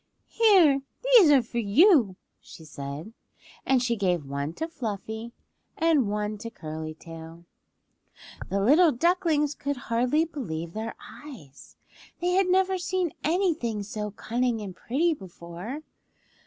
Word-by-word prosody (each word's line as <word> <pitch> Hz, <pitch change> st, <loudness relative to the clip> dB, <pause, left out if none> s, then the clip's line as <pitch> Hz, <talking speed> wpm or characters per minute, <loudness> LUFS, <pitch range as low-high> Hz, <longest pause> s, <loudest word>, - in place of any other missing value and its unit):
"Here; 365 Hz, -12 st, +5 dB, 0.2 s
these -, -, +7 dB
are 275 Hz, -4 st, +5 dB
for 235 Hz, +1 st, -4 dB
you," 235 Hz, -, +4 dB, 0.2 s
she 160 Hz, -, -14 dB
said, 145 Hz, +7 st, -7 dB, 0.5 s
and 260 Hz, -2 st, +3 dB
she 235 Hz, -1 st, +1 dB
gave 180 Hz, -7 st, 0 dB
one 140 Hz, +2 st, -3 dB
to 320 Hz, -, -4 dB
Fluffy 220 Hz, -, -5 dB, 0.5 s
and 315 Hz, -9 st, +2 dB
one 210 Hz, 0 st, -2 dB
to 230 Hz, -, -6 dB
Curly 155 Hz, -4 st, -7 dB
Tail. 165 Hz, +1 st, -11 dB, 1.0 s
The 200 Hz, +1 st, 0 dB
little 305 Hz, -, +5 dB
ducklings 310 Hz, 0 st, +1 dB
could 285 Hz, -1 st, -4 dB
hardly 245 Hz, +7 st, +1 dB
believe 170 Hz, -, -6 dB
their 220 Hz, +1 st, -5 dB
eyes. 205 Hz, -, -13 dB, 0.4 s
They 355 Hz, +1 st, 0 dB
had 375 Hz, +1 st, +3 dB
never 375 Hz, 0 st, +2 dB
seen 360 Hz, -2 st, -1 dB
anything 315 Hz, -, 0 dB
so 210 Hz, +1 st, -5 dB
cunning 235 Hz, +3 st, -1 dB
and 195 Hz, -4 st, -7 dB
pretty 320 Hz, -, 0 dB
before. 190 Hz, -, -8 dB
235 Hz, 130 wpm, -26 LUFS, 195-320 Hz, 1.0 s, these